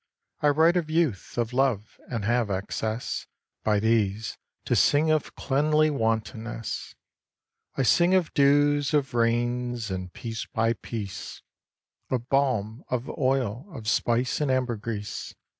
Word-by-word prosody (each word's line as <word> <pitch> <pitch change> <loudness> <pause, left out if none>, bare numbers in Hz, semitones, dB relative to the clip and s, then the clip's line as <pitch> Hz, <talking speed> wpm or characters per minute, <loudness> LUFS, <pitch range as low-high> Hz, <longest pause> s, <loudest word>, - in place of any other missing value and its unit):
I 150 - +2
write 160 +4 +4
of 165 -3 -1
Youth, 155 - 0
of 120 0 -1
Love; 125 -5 0
and 115 -4 -3
have 120 -1 +1
access 110 +4 -3 0.4
By 105 -1 +2
these, 110 -1 +1 0.3
to - - +1
sing 155 +2 +4
of 155 -2 0
cleanly 150 +2 +2
wantonness; 115 -2 -2 0.8
I 135 - +1
sing 175 +8 +4
of 180 -4 +1
dews, 145 +1 +4
of 140 -3 +1
rains, 120 -1 0
and, 90 -1 -4
piece 115 +1 -5
by 115 +1 +1
piece, 105 -4 -7 0.7
Of 125 -1 -2
balm, 125 -4 +1
of 125 +1 -3
oil, 130 - 0
of 110 -9 -8
spice, 120 +4 +1
and 145 - +1
ambergris. 115 -5 -2
120 Hz, 130 wpm, -26 LUFS, 110-140 Hz, 0.8 s, write